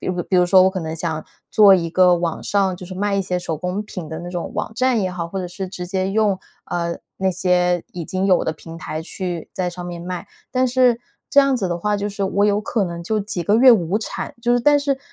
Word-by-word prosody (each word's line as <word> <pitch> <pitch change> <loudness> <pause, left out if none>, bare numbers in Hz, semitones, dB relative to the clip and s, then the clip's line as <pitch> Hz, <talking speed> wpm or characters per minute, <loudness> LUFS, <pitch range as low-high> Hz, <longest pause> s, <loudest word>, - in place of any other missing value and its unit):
比 - - -7
如 180 -1 -1
比 185 - +1
如 180 - +5
说 185 +1 +6
我 190 - +4
可 190 - -4
能 160 -1 -4
想 160 -2 -3 0.3
做 205 -3 +7
一 170 -2 0
个 180 +1 +4
网 170 -1 -2
上， 195 -2 +1
就 180 - -9
是 185 - -8
卖 200 +2 0
一 195 - +1
些 180 -1 -2
手 165 -3 -3
工 180 +5 -3
品 185 -6 -7
的 160 +1 -5
那 175 - -7
种 175 -2 -4
网 - - -3
站 255 -1 +2
也 185 -2 -1
好， 170 -2 -4
或 195 - -4
者 185 - -3
是 185 +1 -6
直 180 -1 -6
接 190 +1 -1
用， 205 -2 +2 0.3
呃， 170 -1 -3 0.2
那 190 0 +1
些 180 -1 +1
已 175 -2 -5
经 185 +4 -1
有 185 -2 +4
的 160 - -1
平 165 +1 -11
台 155 -1 -5
去， 175 0 -5
在 180 -1 -1
上 175 0 -8
面 175 -1 -6
卖， 180 -1 -5 0.2
但 255 0 +2
是 250 -1 +3 0.3
这 - - +3
样 275 -2 +2
子 195 -6 -1
的 175 0 -2
话 210 +3 0
就 205 +1 -2
是 200 -1 -3
我 200 +1 +1
有 205 0 +2
可 215 -1 -1
能 170 -1 -5
就 215 +4 -1
几 195 -3 -3
个 205 - +3
月 255 +2 +8
无 195 -4 +3
产， 220 - -5
就 240 0 +2
是 245 - +4
但 290 +3 +5
是 280 -1 0
185 Hz, 285 characters per minute, -21 LUFS, 175-205 Hz, 0.3 s, 月